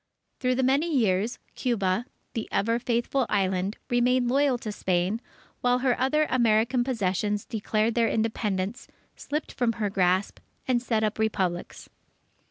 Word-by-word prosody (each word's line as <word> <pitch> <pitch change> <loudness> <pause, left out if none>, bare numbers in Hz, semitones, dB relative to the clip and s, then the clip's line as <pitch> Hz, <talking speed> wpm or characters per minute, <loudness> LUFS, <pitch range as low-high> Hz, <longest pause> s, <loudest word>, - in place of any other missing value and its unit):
Through 255 0 +1
the 260 - +1
many 280 +6 +2
years, 225 -3 +1 0.2
Cuba, 225 -2 0 0.3
the 225 -3 -4
"Ever 230 +4 +1
Faithful 240 +2 0
Island," 190 0 0
remained 245 0 +2
loyal 275 0 +3
to 220 -3 -5
Spain, 190 +3 0 0.4
while 245 0 +2
her 250 -2 +4
other 300 +4 +3
American 235 +1 +3
possessions 210 -4 -1
declared 220 +1 0
their 230 -1 +2
Independence, 215 -2 -1 0.3
slipped 300 +1 -4
from 240 -2 0
her 210 -3 -2
grasp, 185 0 +1 0.3
and 250 -2 +2
set 225 -3 0
up 215 0 -1
Republics. 190 -5 -2
230 Hz, 140 wpm, -27 LUFS, 205-250 Hz, 0.4 s, her